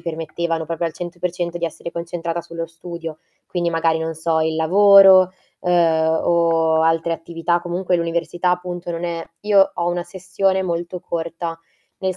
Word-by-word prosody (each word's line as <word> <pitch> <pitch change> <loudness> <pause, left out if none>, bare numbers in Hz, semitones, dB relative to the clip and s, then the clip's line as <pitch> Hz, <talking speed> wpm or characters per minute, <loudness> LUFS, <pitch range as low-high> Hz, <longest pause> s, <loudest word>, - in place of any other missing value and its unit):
permettevano 165 0 -3
proprio 165 +1 -2
al 165 - -4
100% 175 0 -4
di 170 - -1
essere 170 +1 -7
concentrata 170 0 -4
sullo 165 0 -6
studio. 165 -1 -8 0.3
Quindi 175 -1 -1
magari 165 -1 +1
non 160 0 -3
so, 160 0 0
il 160 0 0
lavoro, 190 +2 +7 0.3
uhm, 160 -2 +2
o 165 -2 +2
altre 165 +1 +1
attività, 165 +1 -1
comunque 175 +1 -1
l'università 170 +1 -1
appunto 180 -1 -3
non 170 0 -4
è 170 -1 -3 0.2
Io 200 -2 +4
ho 170 - -2
una 175 0 -1
sessione 190 +2 -1
molto 175 0 -3
corta, 165 -1 -4 0.4
nel 190 -1 -2
170 Hz, 155 wpm, -20 LUFS, 165-175 Hz, 0.4 s, lavoro